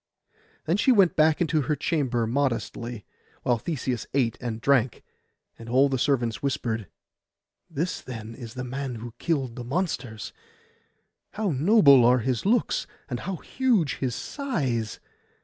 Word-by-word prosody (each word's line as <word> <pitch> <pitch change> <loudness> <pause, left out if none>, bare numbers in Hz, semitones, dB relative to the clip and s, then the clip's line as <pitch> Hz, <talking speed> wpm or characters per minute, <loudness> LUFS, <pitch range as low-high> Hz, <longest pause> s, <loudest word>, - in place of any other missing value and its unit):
Then 165 +4 +1
she 260 - +4
went 195 -7 +5
back 155 0 +4
into 160 -2 +2
her 145 +3 0
chamber 130 -8 0
modestly, 120 -2 -2 0.4
while 120 -2 +2
Theseus 130 -5 -3
ate 120 -5 +2
and 115 -3 -3
drank; 130 -1 +2 0.6
and 115 0 -9
all 135 +3 +4
the 130 -2 -1
servants 120 -5 +1
whispered, 115 -6 -2 0.8
'This, 165 +4 -2
then, 115 -3 -7
is 115 -2 -9
the 130 - -4
man 130 0 -4
who 115 +1 -8
killed 135 -8 -1
the 125 - -6
monsters! 125 - -3 1.0
How 210 -3 -1
noble 140 - +6
are 125 +2 +6
his 125 - -1
looks, 230 +1 +1 0.2
and 120 - -2
how 190 +6 -4
huge 220 - 0
his 125 -3 -2
size! 135 - -2
130 Hz, 145 wpm, -26 LUFS, 120-160 Hz, 1.0 s, noble